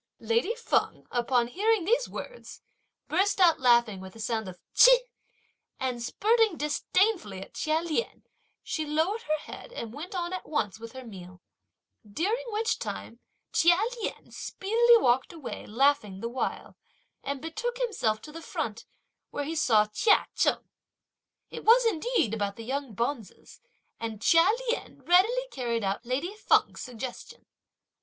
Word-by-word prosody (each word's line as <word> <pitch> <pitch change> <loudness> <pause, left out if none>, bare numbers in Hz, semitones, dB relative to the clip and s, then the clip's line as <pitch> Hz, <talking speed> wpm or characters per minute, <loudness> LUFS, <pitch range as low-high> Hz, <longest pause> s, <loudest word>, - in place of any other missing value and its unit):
Lady 460 -1 0
Feng, 475 - -1
upon 240 0 +1
hearing 415 - +1
these 480 +5 +2
words, - - -9 0.4
burst 390 +5 +1
out 345 -3 +5
laughing 235 -5 +4
with 190 +1 -11
a - - -12
sound 220 -2 -2
of 180 - -10 0.2
Ch'ih, - - +8 0.8
and 255 -2 -2
spurting 435 - +2
disdainfully 300 - 0
at 190 - -11
Chia 310 +1 0
Lien, 340 +7 -3 0.4
she 315 - -2
lowered 320 +9 0
her 310 +1 -1
head 310 - -10
and 235 - -6
went 335 +8 -7
on 350 0 -2
at 370 - -6
once 220 -9 -1
with 230 0 -9
her 260 -1 -9
meal; 185 -4 -11 0.6
during 375 - -2
which 445 0 -1
time 235 - -6 0.3
Chia 345 +1 +5 0.2
Lien - - -5
speedily 470 +4 +3
walked 255 - +2
away 315 -7 -8
laughing 235 -5 +1
the 230 - -3
while, 255 +2 -4 0.5
and 280 0 -3
betook 440 - -4
himself 390 - 0
to 305 - -10
the 330 +2 -9
front, 225 -7 -4 0.4
where 290 - -3
he 310 +3 -4
saw 225 -9 +4
Chia 315 - +3
Cheng. - - +1 0.8
It - - -7
was, 475 +2 +6
indeed, 440 - +1
about 205 -2 -2
the 230 - -9
young 270 -3 -4
bonzes, 235 -1 -5 0.4
and 225 -2 -5
Chia 330 - +5 0.2
Lien 480 - -3
readily 445 +9 +3
carried 235 -4 -2
out 195 +2 -2
lady 280 +11 -2
Feng's - - +2
suggestion. 250 0 -8
295 Hz, 150 wpm, -28 LUFS, -, 0.8 s, Ch'ih